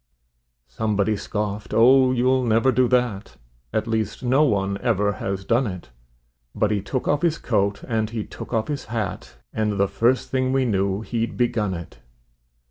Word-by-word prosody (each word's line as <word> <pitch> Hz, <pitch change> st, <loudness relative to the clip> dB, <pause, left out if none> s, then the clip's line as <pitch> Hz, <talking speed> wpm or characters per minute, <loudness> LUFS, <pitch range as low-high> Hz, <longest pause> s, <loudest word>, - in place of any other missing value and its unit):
Somebody 105 Hz, -, 0 dB
scoffed: 105 Hz, 0 st, -4 dB
"Oh, 130 Hz, +3 st, +6 dB
you'll 130 Hz, +1 st, +2 dB
never 115 Hz, +3 st, +3 dB
do 125 Hz, 0 st, +3 dB
that; 115 Hz, -, -1 dB, 0.3 s
At 110 Hz, -, -1 dB
least 110 Hz, +2 st, -2 dB
no 130 Hz, +4 st, +3 dB
one 100 Hz, -7 st, 0 dB
ever 105 Hz, -3 st, +1 dB
has 95 Hz, -1 st, -4 dB
done 120 Hz, +3 st, +2 dB
it"; 90 Hz, -, -7 dB, 0.6 s
But 105 Hz, -, +1 dB
he 105 Hz, -2 st, 0 dB
took 125 Hz, +5 st, -3 dB
off 145 Hz, 0 st, +2 dB
his 165 Hz, -2 st, +1 dB
coat 100 Hz, -3 st, 0 dB
and 110 Hz, -3 st, -1 dB
he 110 Hz, -2 st, -3 dB
took -, -, -10 dB
off 110 Hz, -2 st, 0 dB
his 145 Hz, -2 st, -4 dB
hat, 105 Hz, -, -4 dB, 0.2 s
And 110 Hz, -1 st, 0 dB
the 100 Hz, -, +3 dB
first 115 Hz, +6 st, +1 dB
thing 130 Hz, -1 st, +1 dB
we 135 Hz, -1 st, +2 dB
knew 100 Hz, -2 st, 0 dB
he'd 115 Hz, 0 st, -3 dB
begun 110 Hz, -6 st, 0 dB
it. 85 Hz, -7 st, -9 dB
110 Hz, 170 wpm, -23 LUFS, 100-125 Hz, 0.6 s, Oh